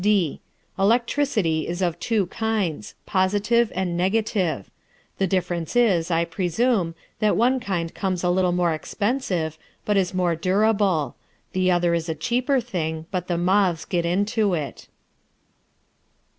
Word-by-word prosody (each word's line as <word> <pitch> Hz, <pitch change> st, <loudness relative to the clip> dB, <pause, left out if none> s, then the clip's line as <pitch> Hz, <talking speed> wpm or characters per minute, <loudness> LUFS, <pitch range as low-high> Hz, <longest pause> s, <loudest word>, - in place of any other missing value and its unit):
(d) 195 Hz, -6 st, +1 dB, 0.4 s
Electricity 220 Hz, -, +1 dB
is 175 Hz, +1 st, -3 dB
of 175 Hz, -2 st, -1 dB
two 220 Hz, -4 st, +1 dB
kinds, 190 Hz, -, -2 dB
positive 205 Hz, +5 st, +2 dB
and 180 Hz, -2 st, -1 dB
negative. 185 Hz, -, 0 dB, 0.5 s
The 195 Hz, -, +2 dB
difference 175 Hz, 0 st, -2 dB
is, 195 Hz, -9 st, +3 dB
I 170 Hz, 0 st, +2 dB
presume, 180 Hz, +2 st, 0 dB, 0.2 s
that 215 Hz, -1 st, +2 dB
one 255 Hz, +3 st, +3 dB
kind 175 Hz, -7 st, -3 dB
comes 185 Hz, -3 st, -2 dB
a 180 Hz, -, +2 dB
little 180 Hz, 0 st, +2 dB
more 175 Hz, -2 st, +1 dB
expensive, 180 Hz, -, -2 dB, 0.3 s
but 210 Hz, -1 st, +2 dB
is 185 Hz, -2 st, +1 dB
more 180 Hz, -2 st, +1 dB
durable; 195 Hz, -2 st, +1 dB, 0.4 s
the 185 Hz, 0 st, +2 dB
other 175 Hz, -1 st, +2 dB
is 165 Hz, 0 st, -1 dB
a 160 Hz, -, -1 dB
cheaper 250 Hz, -, +1 dB
thing, 160 Hz, -9 st, -3 dB
but 180 Hz, -2 st, -2 dB
the 175 Hz, -, 0 dB
moths 180 Hz, -3 st, +2 dB
get 175 Hz, -2 st, -1 dB
into 200 Hz, +3 st, +1 dB
it. 150 Hz, -4 st, -5 dB
185 Hz, 140 wpm, -23 LUFS, 170-210 Hz, 0.5 s, is